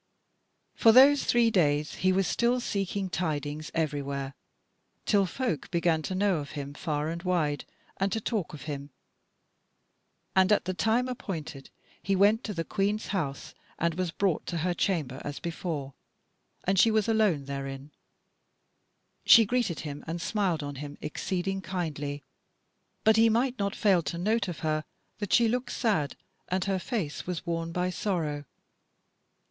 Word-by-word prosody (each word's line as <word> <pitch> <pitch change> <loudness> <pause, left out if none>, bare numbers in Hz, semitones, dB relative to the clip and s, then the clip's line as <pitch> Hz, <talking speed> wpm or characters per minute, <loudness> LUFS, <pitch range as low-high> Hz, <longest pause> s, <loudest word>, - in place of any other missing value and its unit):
For 225 - +6
those 275 +4 +7
three 235 -1 +4
days 150 -5 +2
he 185 - +4
was 190 +1 +2
still 240 +7 +2
seeking 200 -4 -2
tidings 155 -4 -3
everywhere, 140 -3 -2 0.7
till 200 -2 +3
folk 205 - -2
began 170 -2 +1
to 185 - -4
know 195 -2 +2
of 145 -2 -6
him 140 0 -5
far 150 -2 -2
and 170 +1 -4
wide, 165 -6 0 0.3
and 195 0 0
to 225 - 0
talk 210 -5 -2
of 145 - -10
him. 145 -2 -5 1.5
And 190 +1 +5
at 210 - +3
the 185 - -1
time 225 +6 +1
appointed 160 - -6 0.3
he 195 +4 0
went 205 +5 +4
to 210 - -3
the 165 - -1
Queen's 205 +4 -1
House 150 -9 -3 0.2
and 170 0 +1
was 180 +1 -1
brought 180 0 0
to 175 - -2
her 180 - +1
chamber 160 -8 -1
as 145 -1 -5
before, 160 -5 -4 0.7
and 195 0 +2
she 225 - +6
was 215 -1 +2
alone 210 -11 +2
therein. 135 +1 -6 1.3
She 225 - +8
greeted 235 -7 0
him 145 -1 -6
and 165 +2 -3
smiled 180 -5 0
on 145 -1 -5
him 145 +1 -7
exceeding 190 +4 -2
kindly, 150 -7 -4 0.8
but 220 0 +5
he 225 0 +6
might 240 +2 +1
not 200 0 -1
fail 195 -5 +3
to 170 - -4
note 210 +3 +1
of 170 -3 -6
her 155 -1 0 0.4
that 205 -3 -4
she 235 -1 +5
looked 245 +2 -1
sad 195 - 0 0.3
and 185 0 -1
her 195 -1 0
face 180 - -3
was 180 -3 -3
worn 165 -1 -2
by 180 +1 -1
sorrow. 160 -7 -2
180 Hz, 160 wpm, -28 LUFS, 150-205 Hz, 1.5 s, She